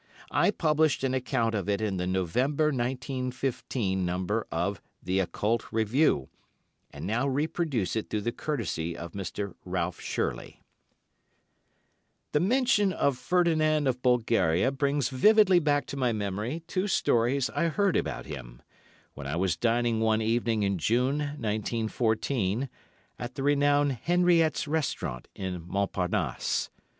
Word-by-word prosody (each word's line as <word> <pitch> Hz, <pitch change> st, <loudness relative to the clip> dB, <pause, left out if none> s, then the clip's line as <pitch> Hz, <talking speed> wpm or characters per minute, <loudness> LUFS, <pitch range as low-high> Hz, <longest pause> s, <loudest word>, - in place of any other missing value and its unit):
I -, -, +3 dB
published 155 Hz, -6 st, +2 dB
an 130 Hz, -1 st, +1 dB
account 125 Hz, -3 st, 0 dB
of 100 Hz, -2 st, -2 dB
it 100 Hz, -1 st, +1 dB
in 105 Hz, -3 st, -1 dB
the 90 Hz, 0 st, -2 dB
November, 125 Hz, -, +1 dB
1915, 125 Hz, -5 st, -2 dB
number 95 Hz, +5 st, -1 dB
of 90 Hz, +3 st, -1 dB, 0.2 s
"The 95 Hz, +2 st, 0 dB
Occult 105 Hz, +4 st, -1 dB
Review," 110 Hz, -, +2 dB, 0.6 s
and -, -, -8 dB
now 120 Hz, +7 st, 0 dB
reproduce 140 Hz, -, -1 dB
it 110 Hz, -, -3 dB
through 105 Hz, -, -1 dB
the 120 Hz, -, -1 dB
courtesy 90 Hz, -, -3 dB
of 85 Hz, 0 st, -7 dB
Mr. 100 Hz, +1 st, -5 dB
Ralph 90 Hz, -1 st, -3 dB
Shirley: -, -, -3 dB, 1.7 s
"The 150 Hz, -, +2 dB
mention 210 Hz, -, +3 dB
of 140 Hz, -6 st, +1 dB
Ferdinand 155 Hz, -2 st, +2 dB
of 125 Hz, -2 st, 0 dB
Bulgaria 115 Hz, -5 st, +2 dB
brings 140 Hz, -1 st, 0 dB
vividly 190 Hz, +7 st, +5 dB
back 145 Hz, -3 st, +1 dB
to 140 Hz, -, -7 dB
my 125 Hz, -3 st, +2 dB
memory 105 Hz, -, -3 dB
two 185 Hz, +3 st, -1 dB
stories 130 Hz, -, +2 dB
I 170 Hz, -, 0 dB
heard 190 Hz, +3 st, +1 dB
about -, -, -2 dB
him, 65 Hz, -5 st, -9 dB, 0.5 s
when 70 Hz, -1 st, -7 dB
I 70 Hz, -, -2 dB
was 90 Hz, -1 st, +1 dB
dining 120 Hz, +1 st, +1 dB
one 110 Hz, 0 st, +2 dB
evening 115 Hz, -1 st, +1 dB
in 100 Hz, -2 st, 0 dB
June, 125 Hz, -, +1 dB
1914, 115 Hz, -2 st, -1 dB, 0.5 s
at 120 Hz, +1 st, -6 dB
the 135 Hz, -, -3 dB
renowned 145 Hz, -2 st, +3 dB
Henriette's 175 Hz, -3 st, +3 dB
Restaurant 145 Hz, -, -2 dB
in 95 Hz, -2 st, -4 dB
Montparnasse. 95 Hz, -, -1 dB
120 Hz, 135 wpm, -28 LUFS, 100-145 Hz, 1.7 s, vividly